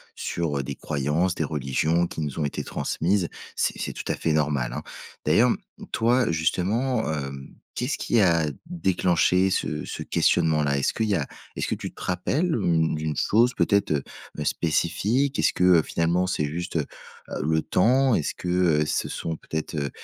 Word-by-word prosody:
sur 75 Hz, -5 st, -2 dB
des 70 Hz, 0 st, -5 dB
croyances, 75 Hz, +6 st, 0 dB
des 80 Hz, -, -2 dB
religions 75 Hz, +4 st, 0 dB
qui 80 Hz, -, -5 dB
nous 75 Hz, -1 st, -4 dB
ont 75 Hz, -, +1 dB
été 70 Hz, -, -3 dB
transmises. 90 Hz, +1 st, 0 dB, 0.3 s
C'est -, -, +1 dB
c'est -, -, -2 dB
tout -, -, -6 dB
à -, -, +1 dB
fait 80 Hz, -, 0 dB
normal, 70 Hz, -5 st, 0 dB
hein. -, -, -5 dB, 0.4 s
D'ailleurs, 110 Hz, +11 st, +5 dB
mmh, -, -, -5 dB
toi, 120 Hz, -1 st, +2 dB
justement, 105 Hz, +8 st, 0 dB
hem, 70 Hz, -2 st, -5 dB, 0.3 s
qu'est-ce 125 Hz, +4 st, -2 dB
qui 115 Hz, -, +1 dB
a 85 Hz, -4 st, +4 dB, 0.2 s
déclenché 95 Hz, -, +2 dB
ce 75 Hz, -4 st, -1 dB
ce -, -, -5 dB
questionnement-là? 75 Hz, -3 st, +2 dB
Est-ce 70 Hz, -, +1 dB
qu'il 110 Hz, -1 st, -1 dB
y 100 Hz, -, +3 dB
a 70 Hz, -5 st, 0 dB, 0.3 s
est-ce -, -, -2 dB
que -, -, -1 dB
tu -, -, -6 dB
te -, -, -17 dB
rappelles, 145 Hz, -, 0 dB
mmh, 80 Hz, -2 st, +1 dB
d'une 80 Hz, -1 st, -2 dB
chose 120 Hz, +4 st, +3 dB
peut-être, 100 Hz, -1 st, +2 dB
heu, 70 Hz, -, -1 dB, 0.3 s
ben 75 Hz, -, -4 dB
spécifique? 110 Hz, -, +1 dB
Est-ce -, -, +3 dB
que, 90 Hz, -, 0 dB, 0.2 s
heu, -, -, +3 dB
finalement, 85 Hz, +4 st, 0 dB
c'est 75 Hz, -5 st, 0 dB
juste, 85 Hz, +4 st, -5 dB
heu, 75 Hz, -3 st, +1 dB, 0.6 s
le 80 Hz, +1 st, +1 dB
temps? 130 Hz, +5 st, +3 dB
Est-ce 75 Hz, -, 0 dB
que, 90 Hz, -, -7 dB
heu, 85 Hz, -4 st, +3 dB
ce -, -, -1 dB
sont 80 Hz, -1 st, -4 dB
peut-être, 80 Hz, 0 st, -5 dB
heu, 70 Hz, -1 st, -1 dB
85 Hz, 185 wpm, -25 LUFS, 75-100 Hz, 0.6 s, D'ailleurs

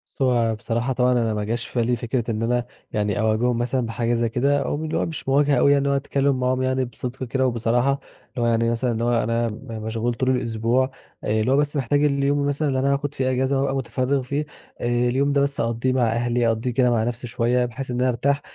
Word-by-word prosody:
بُص -, -, -12 dB
هو 120 Hz, -3 st, +2 dB
بصراحة 120 Hz, +3 st, -2 dB
طبعًا 125 Hz, 0 st, +2 dB
أنا 115 Hz, -3 st, +1 dB
ما 105 Hz, 0 st, -2 dB
جاش 115 Hz, +2 st, -2 dB
في 125 Hz, -, -3 dB
بالي 120 Hz, +1 st, +1 dB
فكرة 120 Hz, 0 st, -2 dB
إن 110 Hz, +1 st, -2 dB
أنا 120 Hz, +1 st, 0 dB, 0.3 s
يعني 105 Hz, +2 st, -1 dB
أواجههم 110 Hz, +2 st, +1 dB
مثلًا 120 Hz, +1 st, 0 dB
بحاجة 115 Hz, +1 st, -1 dB
زي 115 Hz, -1 st, +1 dB
كده 140 Hz, +5 st, +1 dB
أو 140 Hz, -, -2 dB
م 155 Hz, -, -4 dB
اللي 155 Hz, -, -2 dB
هو -, -, +1 dB
مش 160 Hz, -4 st, -5 dB
مواجهة 145 Hz, +1 st, +3 dB
اوي 140 Hz, +2 st, +5 dB
اللي 140 Hz, 0 st, +1 dB
هو 140 Hz, -, +2 dB
أتكلم 140 Hz, -1 st, 0 dB
معاهم 130 Hz, 0 st, +1 dB
يعني 130 Hz, 0 st, +1 dB
بصدق 125 Hz, +1 st, -6 dB
كده 130 Hz, +1 st, 0 dB
وبصراحة، 120 Hz, +2 st, +1 dB
اللي 135 Hz, -2 st, -7 dB
هو 120 Hz, -, +2 dB
يعني 115 Hz, 0 st, +2 dB
مثلًا 120 Hz, +1 st, 0 dB
اللي 115 Hz, 0 st, -2 dB
هو 120 Hz, -1 st, +2 dB
أنا 115 Hz, +1 st, 0 dB
م 115 Hz, +3 st, -9 dB
مشغول 115 Hz, +2 st, -1 dB
طول 130 Hz, +2 st, -1 dB
الأسبوع 125 Hz, +1 st, +1 dB, 0.3 s
اللي 110 Hz, +3 st, +1 dB
هو 135 Hz, -, +4 dB
بس 145 Hz, +1 st, 0 dB
محتاج 145 Hz, +2 st, +1 dB
اليوم 140 Hz, 0 st, +2 dB
مثلًا 145 Hz, +2 st, 0 dB
اللي 135 Hz, -2 st, 0 dB
أنا 140 Hz, +1 st, +2 dB
هاخد 145 Hz, +1 st, -2 dB
فيه 130 Hz, -2 st, 0 dB
أجازة 130 Hz, +1 st, +1 dB
وأبقى 135 Hz, 0 st, 0 dB
متفرغ 130 Hz, +1 st, 0 dB
فيه، 140 Hz, +4 st, -2 dB, 0.4 s
اليوم 125 Hz, +4 st, +1 dB
ده 140 Hz, -, +3 dB
بس 140 Hz, 0 st, -1 dB
أقَضيه 115 Hz, +3 st, 0 dB
مع 130 Hz, -, +1 dB
أهلي 120 Hz, 0 st, +1 dB
أقَضيه 115 Hz, +2 st, 0 dB
كده 125 Hz, 0 st, +2 dB
مع 115 Hz, -2 st, +2 dB
نفسي 120 Hz, +1 st, -3 dB
شوية 120 Hz, +1 st, +1 dB
بحيث 125 Hz, +2 st, -6 dB
إن 125 Hz, -, -2 dB
أنا 130 Hz, -, +3 dB
أرتاح، 140 Hz, +4 st, 0 dB
125 Hz, 235 wpm, -23 LUFS, 115-135 Hz, 0.4 s, اوي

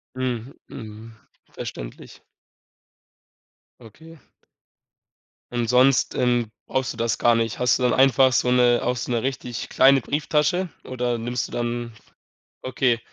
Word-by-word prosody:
Mhm, 130 Hz, 0 st, -3 dB
mhm, 110 Hz, +1 st, -10 dB, 0.4 s
verständlich. -, -, -9 dB, 1.6 s
Okay. 160 Hz, +9 st, -15 dB, 1.3 s
Und 120 Hz, -1 st, -1 dB
sonst, 125 Hz, +2 st, +3 dB
ähm, 120 Hz, -3 st, +1 dB, 0.2 s
brauchst 130 Hz, -1 st, -2 dB
du -, -, -14 dB
das 115 Hz, 0 st, -1 dB
gar 120 Hz, -1 st, +3 dB
nicht. 115 Hz, -1 st, -1 dB
Hast 125 Hz, -1 st, +3 dB
du 125 Hz, -, -3 dB
dann 125 Hz, -, +3 dB
einfach 135 Hz, 0 st, +4 dB
so 125 Hz, 0 st, +1 dB
'ne 125 Hz, -1 st, +4 dB
auch 125 Hz, +1 st, 0 dB
so 120 Hz, 0 st, -5 dB
'ne 120 Hz, -1 st, 0 dB
richtig 125 Hz, -2 st, -4 dB
kleine 135 Hz, +1 st, +5 dB
Brieftasche 150 Hz, +7 st, 0 dB, 0.2 s
oder 125 Hz, -2 st, -2 dB
nimmst 120 Hz, +1 st, -3 dB
du -, -, -16 dB
dann 120 Hz, 0 st, -3 dB, 0.7 s
okay, 125 Hz, -2 st, 0 dB
125 Hz, 135 wpm, -23 LUFS, 115-130 Hz, 1.6 s, kleine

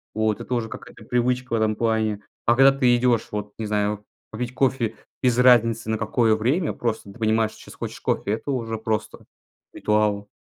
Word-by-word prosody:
Вот 110 Hz, -1 st, 0 dB
это -, -, -10 dB
уже 115 Hz, -2 st, -1 dB
какая-то -, -, -11 dB
привычка 125 Hz, +1 st, 0 dB
в -, -, +4 dB
этом 110 Hz, -1 st, +1 dB
плане. 110 Hz, -2 st, 0 dB, 0.3 s
А 120 Hz, -, +5 dB
когда 135 Hz, +1 st, +7 dB
ты 125 Hz, -3 st, +3 dB
идешь 120 Hz, -2 st, +2 dB
вот, 105 Hz, 0 st, -5 dB
не 110 Hz, -, -2 dB
знаю, 105 Hz, 0 st, -1 dB, 0.3 s
попить 120 Hz, +2 st, -4 dB
кофе 125 Hz, -3 st, 0 dB, 0.3 s
без 125 Hz, -2 st, +2 dB
разницы 115 Hz, -3 st, +4 dB
на 110 Hz, -, +1 dB
какое 110 Hz, 0 st, +2 dB
время, 135 Hz, +10 st, 0 dB
просто 110 Hz, -4 st, -3 dB
ты 120 Hz, -, -15 dB
понимаешь, 110 Hz, 0 st, +2 dB
сейчас -, -, -13 dB
хочешь -, -, -7 dB
кофе- 100 Hz, -, -1 dB
это 115 Hz, +6 st, -2 dB
уже 115 Hz, -4 st, -2 dB
просто 110 Hz, 0 st, -3 dB, 0.5 s
ритуал. 105 Hz, -1 st, 0 dB
115 Hz, 185 wpm, -23 LUFS, 110-125 Hz, 0.5 s, когда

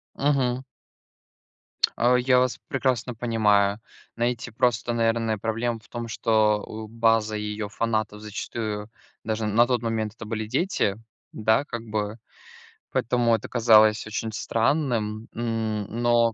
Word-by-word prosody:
Мгм. 130 Hz, -3 st, +1 dB, 1.4 s
А, 125 Hz, +1 st, +4 dB
я 125 Hz, 0 st, +4 dB
вас 125 Hz, -1 st, +1 dB
прекрасно 130 Hz, -3 st, 0 dB
понимаю. 105 Hz, -3 st, +2 dB, 0.4 s
Знаете, 120 Hz, 0 st, -1 dB
просто, 120 Hz, 0 st, +1 dB
наверное, 115 Hz, -1 st, +1 dB
проблема 115 Hz, +2 st, -1 dB
в 105 Hz, -, -23 dB
том, 120 Hz, -1 st, -5 dB
что, 110 Hz, -1 st, +2 dB
у, 110 Hz, 0 st, -7 dB
база 115 Hz, -1 st, +2 dB
её 105 Hz, 0 st, -3 dB
фанатов 110 Hz, -1 st, -2 dB
зачастую, 105 Hz, 0 st, -5 dB, 0.3 s
даже 110 Hz, 0 st, -2 dB
н 105 Hz, -1 st, -1 dB
на 120 Hz, +2 st, +6 dB
тот 125 Hz, -1 st, 0 dB
момент, 110 Hz, -2 st, -2 dB
это 115 Hz, -, -9 dB
были 110 Hz, 0 st, -3 dB
дети, 125 Hz, -, 0 dB, 0.4 s
да 110 Hz, +4 st, +2 dB
как 120 Hz, -5 st, -6 dB
бы. 105 Hz, 0 st, -3 dB, 0.7 s
Поэтому 120 Hz, -1 st, +2 dB
это -, -, -5 dB
казалось 110 Hz, -3 st, +5 dB
очень 110 Hz, +1 st, -3 dB
странным, 115 Hz, -1 st, 0 dB
м, 110 Hz, -2 st, -2 dB, 0.2 s
но 120 Hz, -1 st, +3 dB
115 Hz, 130 wpm, -25 LUFS, 110-120 Hz, 1.4 s, на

